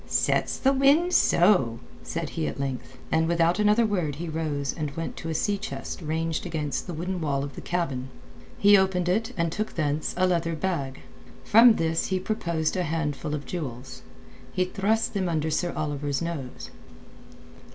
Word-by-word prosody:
"Sets - - +1
the 270 0 +3
wind 285 +7 +4
so!" 170 - +4 0.2
said 80 0 -4
he 80 - -2
at 70 - -5
length, 135 -2 -4
and 160 0 +2
without 170 +2 +2
another 210 +2 +4
word 180 -9 -1
he 170 +4 -5
rose 155 -4 -2
and 155 -3 -3
went 165 - -4
to 165 - -6
a - - -1
sea 205 +5 0
chest 195 - -6
ranged 160 0 -2
against 155 -4 -3
the 175 - -4
wooden 180 +2 -3
wall 140 -3 0
of 140 -1 -6
the - - -8
cabin. 140 -7 -2 0.5
He 205 0 +7
opened 190 -2 +2
it 220 +6 +1
and 170 -1 +1
took 215 +5 -3
thence 150 -1 -1
a 185 - +3
leather 165 -2 +1
bag. 150 -6 -3 0.4
From 230 +1 +7
this 165 0 0
he 190 -1 0
produced 170 -6 -1
a 185 - +1
handful 150 -3 -2
of 145 - -6
jewels. 130 -7 -6 0.5
He 185 - +1
thrust 210 +4 0
them 190 -4 0
under 160 -1 0
Sir 175 +3 0
Oliver's 145 -2 -2
nose. 150 -7 -5
165 Hz, 175 wpm, -26 LUFS, 150-190 Hz, 0.5 s, He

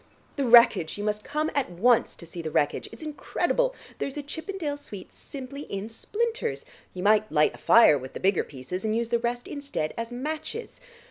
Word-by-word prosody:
The 275 -3 0
wreckage: 235 -9 +6
you 205 - -4
must 210 0 -1
come 305 +2 -1
at 280 -7 0
once 225 +7 +3
to 170 - -11
see 170 +1 -7
the 160 - -4
wreckage. 150 -1 0
It's - - -10
incredible; - - 0 0.2
there's 275 +1 -3
a 295 - -3
Chippendale 320 +1 -4
suite 205 -9 -10
simply 275 0 -8
in 200 +2 -4
splinters. 460 - -2 0.3
You 180 - -4
might 215 +1 +4
light 150 -1 +3
a - - -13
fire 225 -11 +6
with 130 +1 -9
the - - -6
bigger 190 -1 +2
pieces, 140 +7 -6
and 220 0 0
use 230 0 -1
the 235 - +2
rest 240 +1 -2
instead 280 - -3
of 230 +1 -4
matches. 310 - -5
235 Hz, 195 wpm, -27 LUFS, 190-290 Hz, 0.3 s, wreckage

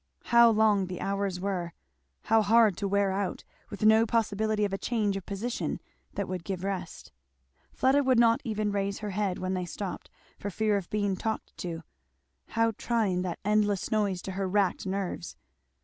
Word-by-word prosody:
How 235 0 +6
long 210 -3 +3
the 180 -1 -6
hours 195 -2 -2
were 180 -3 -3 0.5
how 225 0 +4
hard 215 -1 +5
to 200 - -1
wear 200 0 +2
out, 195 -1 -2 0.3
with 210 0 -3
no 220 +1 +6
possibility 215 -1 +1
of 200 - -3
a - - 0
change 215 -5 0
of 195 -1 -6
position 220 +5 -3 0.4
that 200 - -2
would 185 -2 -4
give 190 -1 -4
rest; 190 -3 -5 0.6
Fleda 275 +2 +3
would 260 -2 +3
not 230 -1 +4
even 215 -3 -1
raise 200 0 -1
her 210 -1 -5
head 195 -2 -1
when 185 0 -2
they 180 -1 -2
stopped, 195 +1 -6 0.3
for 205 - -4
fear 215 +2 +1
of 195 -3 -3
being 205 -2 0
talked 220 +3 -4
to; 165 -2 -5 0.6
how 230 0 +1
trying 215 -7 +1
that 180 -2 -3
endless 210 -2 +1
noise 205 -4 0
to 190 - -5
her 190 0 -2
racked 200 -1 +1
nerves. 190 -2 -3
200 Hz, 180 wpm, -28 LUFS, 190-220 Hz, 0.6 s, How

